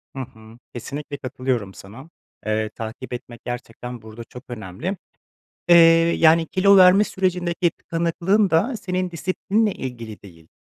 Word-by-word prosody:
Hı - - -5
hı. 110 -3 -10 0.2
Kesinlikle 145 +4 -6
katılıyorum 130 -6 -3
sana. 115 +11 -13 0.4
Eee, 110 0 -1
takip 115 +4 -8
etmek 120 -1 -9
gerçekten 120 0 -7
burada 110 +1 -10
çok 125 +2 -12
önemli, 120 - -5 0.7
eee, 175 - +8 0.4
yani 165 0 +5
kilo 200 +1 +4
verme 185 +2 +7
sürecindeki 180 -3 -1
tıkanıklığın 170 +4 0
da 220 +10 +1
senin 185 -3 -3
disiplinle 195 +6 -1
ilgili 115 -5 -7
değil, 85 -5 -16
135 Hz, 130 wpm, -22 LUFS, 115-180 Hz, 0.7 s, eee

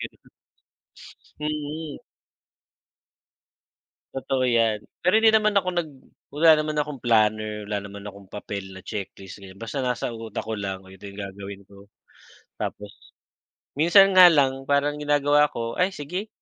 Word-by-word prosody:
ganun. - - -10 1.1
Mm. 150 0 -4 2.2
Totoo 135 -1 -1
'yan. 115 -3 +2 0.2
Pero 180 - +2
hindi 225 0 +5
naman 215 -1 +3
ako 185 -1 +1
nag 175 -3 -1 0.4
wala 160 +2 +4
naman 155 0 -2
akong 150 -3 -3
planner, 110 -2 +1
wala 105 0 -2
naman 100 0 -10
akong 100 -1 -11
papel 100 -2 -7
na 95 - -10
checklist, 95 -1 -7
ganyan. 95 0 -12
Basta 115 +5 -5
nasa 125 -1 -2
utak 115 -1 -6
ko 110 - -4
lang, 95 -1 -4
"Oh, 95 - -16
eto 95 +1 -11
yung 100 +1 -8
gagawin 100 0 -8
ko." 100 0 -17 0.7
Tapos 105 -1 -7 0.7
minsan 195 +6 +6
nga 185 -1 +10
lang 135 -3 +1
parang 145 +1 +1
ginagawa 145 0 +3
ko, 115 0 -4
"Ay 185 +1 +2
sige, 180 +9 -5
125 Hz, 145 wpm, -24 LUFS, 100-150 Hz, 2.2 s, nga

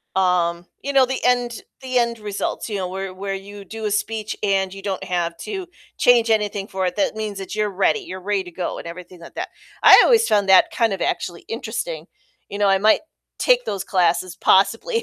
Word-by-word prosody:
um 175 -2 +1 0.2
you 280 - -2
know, 270 -2 +5
the 265 +1 -4
end 245 -1 +1 0.2
the 255 -1 -2
end 235 -1 -1
results, 205 +2 -4
you 205 - -2
know, 185 -2 -2
where 190 0 -5
where 195 +1 -4
you 200 +1 -8
do 220 +3 -7
a 210 - -1
speech, 215 +1 -2
and 195 -2 +1
you 195 - -9
don't 195 -1 -3
have 175 -2 -2
to 385 -4 -5 0.3
change 235 -2 +4
anything 210 -2 0
for 190 -2 -2
it, 180 - -2
that 290 -6 0
means 215 -2 -4
that 195 +2 -6
you're 210 -1 0
ready 195 - +1
you're 335 - -8
ready 200 0 -1
to 175 - -10
go, 175 +1 -4
and - - -8
everything 180 +1 -10
like 170 - -13
that. - - -4 0.3
I - - +10
always 460 -2 +4
found 205 -2 +2
that 190 -1 +6
kind 230 -4 +1
of 195 - -5
actually 175 -2 -2
interesting, 235 - -4 0.4
you 200 - -5
know, 205 -1 +2
I 195 - +4
might 215 +3 +4 0.4
take - - +3
those 195 -2 -3
classes 175 -2 +1
possibly 225 - +2
200 Hz, 215 wpm, -21 LUFS, 185-225 Hz, 0.4 s, I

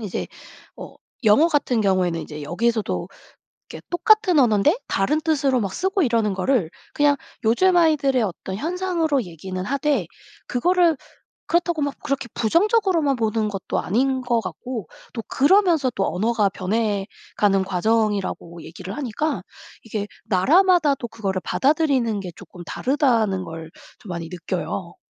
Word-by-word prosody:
이제 205 -5 -4 0.5
어 - - -10 0.3
영어 220 +10 +6
같은 265 -7 +1
경우에는 180 -4 +1
이제 150 -1 -8
여기서도 220 +8 -1 0.6
이렇게 - - -9
똑같은 370 0 +3
언어인데 245 - +3
다른 290 +11 +1
뜻으로 280 -5 +1
막 195 -3 -3
쓰고 380 0 0
이러는 225 -5 +1
거를 190 -3 +1 0.2
그냥 290 -1 +3 0.3
요즘 355 +12 +3
아이들의 280 -6 +3
어떤 190 -1 -4
현상으로 330 -4 -1
얘기는 185 +2 -6
하되 280 - 0 0.4
그거를 345 +5 +2 0.5
그렇다고 345 -3 +1
막 285 -1 -1
그렇게 275 -4 -2
부정적으로만 335 - +2
보는 220 -1 0
것도 195 -2 -3
아닌 260 +6 0
것 240 -2 +1
같고 220 +5 -6 0.3
또 230 - -4
그러면서 320 -3 +3
또 195 - 0
언어가 215 +1 +1
변해가는 200 0 -1
과정이라고 195 -3 -1
얘기를 180 +4 -8
하니까 290 +3 -2 0.4
이게 210 -2 -4 0.2
나라마다도 290 - +3
그거를 195 -5 -3
받아들이는 270 -7 +1
게 180 -2 -7
쪼끔 175 - -12
다르다는 230 -9 +1
걸 165 -1 -8 0.3
좀 205 - -13
많이 170 -2 -5
느껴요. 180 0 -4
235 Hz, 330 characters per minute, -22 LUFS, 195-300 Hz, 0.6 s, 영어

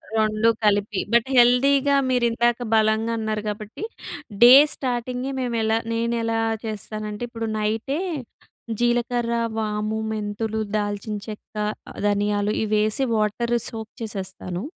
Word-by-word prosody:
2 215 +1 +3
కలిపి 205 -1 +2
బట్ 235 +1 +4
హెల్తీగా 275 +3 +5
మీరందాక 240 -1 +2 0.2
బలంగా 220 +1 +2
అన్నారు 215 -1 -2
కాబట్టి 210 - -7 0.6
డే 245 +1 +10 0.2
స్టార్టింగే, 250 0 -3
మేమెలా 225 -3 0 0.2
నేనెలా 230 0 0 0.3
చేస్తానంటే 215 0 -5
ఇప్పుడు 230 -1 -4
నైటే 225 +8 -1 0.8
జీలకర్ర, 240 0 +1 0.2
వాము, 215 0 -1
మెంతులు, 220 +1 -3 0.2
దాల్చిన 205 +1 -3
చెక్క, 215 0 -10 0.5
ధనియాలు 205 0 +1
ఇవేసి 215 +3 +1
వాటర్ 220 +3 0 0.2
సోక్ 220 -1 -7
చేసేస్తాను. 190 -3 -5
220 Hz, 100 wpm, -23 LUFS, 210-235 Hz, 0.8 s, డే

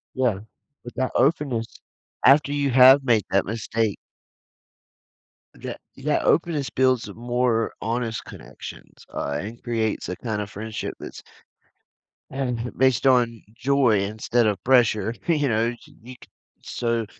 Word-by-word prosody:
Yeah, 120 -7 +1 0.4
but 120 - -9
that 130 0 -1
openness 135 -6 +1 0.6
after 140 +2 +6
you 145 -1 0
have 130 +2 +7
made 115 -5 +3
that 100 - +2
mistake 110 -1 -2 1.6
that - - -8 0.2
that 145 +2 0
openness 160 -5 +1
builds 130 -5 +1
more 120 0 0
honest 115 0 -2
connections, - - -12
uh, - - -3
and 110 +4 -8
creates 115 -3 -2
a 90 - -4
kinda 105 -1 -4
friendship 105 +2 -6
that's - - -9 1.1
and 125 -3 -3
based 130 -1 +3
on 120 -3 +3 0.2
joy 125 -5 +2
instead 110 +4 0
of 100 -4 -1
pressure, 115 -4 +3
you 150 -5 +2
know, 115 +2 +1 0.3
you 125 +2 -10
c - - -16 0.5
so 115 -1 -2
120 Hz, 125 wpm, -24 LUFS, 110-130 Hz, 1.6 s, have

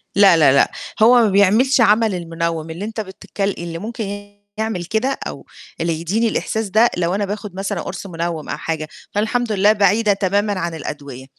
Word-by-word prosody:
لا، 195 -4 +6
لا، 145 -4 +6
لأ، 140 - +4 0.3
هو 235 +3 +7
ما 215 - +3
بيعملش 215 +7 +4
عَمَل 215 -1 +4
المنوّم 165 -2 -3
اللي 170 +6 -5
أنت 220 0 -4
بتتك 190 0 -9
اللي 170 -4 -2
ممكن 205 -2 -6 0.2
يعمل 220 -6 -2
كده 240 +8 -1
أو - - -8 0.4
اللي 165 -1 -1
يديني 215 +7 0
الإحساس 220 0 -2
ده، 220 +5 +4
لو 175 +1 0
أنا 205 0 0
باخد 205 -1 -6
مثلًا 195 +1 -3
قُرص 190 +2 -6
منوّم 170 -3 -4
أو - - -3
حاجة، 160 -1 -3 0.3
فالحمد 220 +3 0
لله 205 0 +4
بعيدة 205 +1 +3
تمامًا 200 0 0
عن 170 -1 -3
الأدوية. 140 -4 -7
200 Hz, 180 wpm, -19 LUFS, 170-215 Hz, 0.4 s, هو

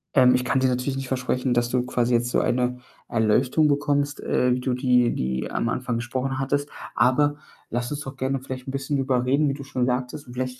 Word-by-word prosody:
Ähm, 125 -2 +6
ich 125 0 +1
kann 135 +1 +1
dir 130 - +3
natürlich 125 +2 -1
nicht 135 0 -4
versprechen, 125 -1 -1
dass 120 0 +1
du 125 0 0
quasi 120 -1 +1
jetzt 120 +1 +1
so - - +2
eine 125 0 0 0.3
Erleuchtung 125 +7 +2
bekommst, 145 0 0
äh, 125 0 +2
wie - - -3
du 125 0 -1
die 125 -2 +3
die 65 0 -2
am 115 - -1
Anfang 125 -1 -2
gesprochen 130 +3 -2
hattest. 145 +2 -1 0.3
Aber 145 +3 +3 0.3
lass 120 +2 -2
uns 145 - -3
doch 135 -2 -7
gerne 130 0 -1
vielleicht 130 0 -7
'n - - -3
bisschen 135 +1 -2
drüber 130 -2 +1
reden, 140 +4 +3
wie - - 0
du 140 - -7
schon 130 -2 -1
sagtest 125 +3 -2
und 120 - -10
vielleicht 125 0 -4
130 Hz, 225 wpm, -24 LUFS, 125-135 Hz, 0.3 s, Ähm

